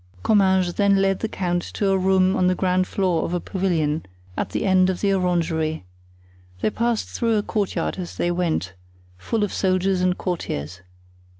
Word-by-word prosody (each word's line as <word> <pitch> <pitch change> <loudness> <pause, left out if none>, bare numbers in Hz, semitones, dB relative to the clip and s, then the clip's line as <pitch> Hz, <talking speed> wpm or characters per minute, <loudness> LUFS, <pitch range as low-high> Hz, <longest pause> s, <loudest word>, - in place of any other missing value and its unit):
Comminges 190 -4 +3
then 200 -1 +4
led 195 0 +1
the 220 - -1
count 175 -3 -1
to 195 +3 -1
a - - +3
room 190 0 +3
on 185 -5 +2
the 185 - +2
ground 185 0 +1
floor 180 -4 0
of 175 - -2
a - - 0
pavilion, 165 -5 -1 0.3
at - - -2
the - - -2
end 185 -1 +4
of 185 - -2
the 200 -1 +1
orangery. 165 - 0 0.8
They - - +1
passed 235 0 -1
through 230 -1 0
a 205 - 0
courtyard 195 -5 -2
as 180 - -6
they 175 - 0
went, 165 - -1 0.4
full 210 - -2
of 205 - -2
soldiers 185 0 +1
and 180 0 +1
courtiers. 90 - -4
185 Hz, 180 wpm, -23 LUFS, 175-195 Hz, 0.8 s, then